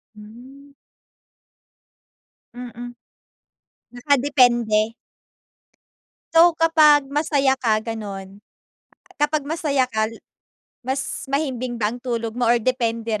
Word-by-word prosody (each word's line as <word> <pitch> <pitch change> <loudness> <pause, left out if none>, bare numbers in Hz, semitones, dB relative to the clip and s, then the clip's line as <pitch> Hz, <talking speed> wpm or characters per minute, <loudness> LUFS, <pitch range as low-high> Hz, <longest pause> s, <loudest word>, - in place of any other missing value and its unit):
Hmm. 255 +7 -15 1.8
Mm. 245 0 -9 1.0
Nakadepende? 245 -5 +2 1.4
So, 330 0 +5
kapag 305 -3 +5
masaya 285 -3 +2
ka 230 -5 0
ganun 205 -3 -7 0.8
kapag 295 +1 0
masaya 285 -3 -1
ka, 220 -2 0 0.8
mas 265 +1 -4
mahimbing 255 -4 -2
ba 215 -1 -1
ang 245 - -9
tulog 230 -3 -3
mo 240 0 -1
or 240 - +4
depende 230 -2 -1
rin? 215 - -1
245 Hz, 90 wpm, -21 LUFS, 225-280 Hz, 1.8 s, So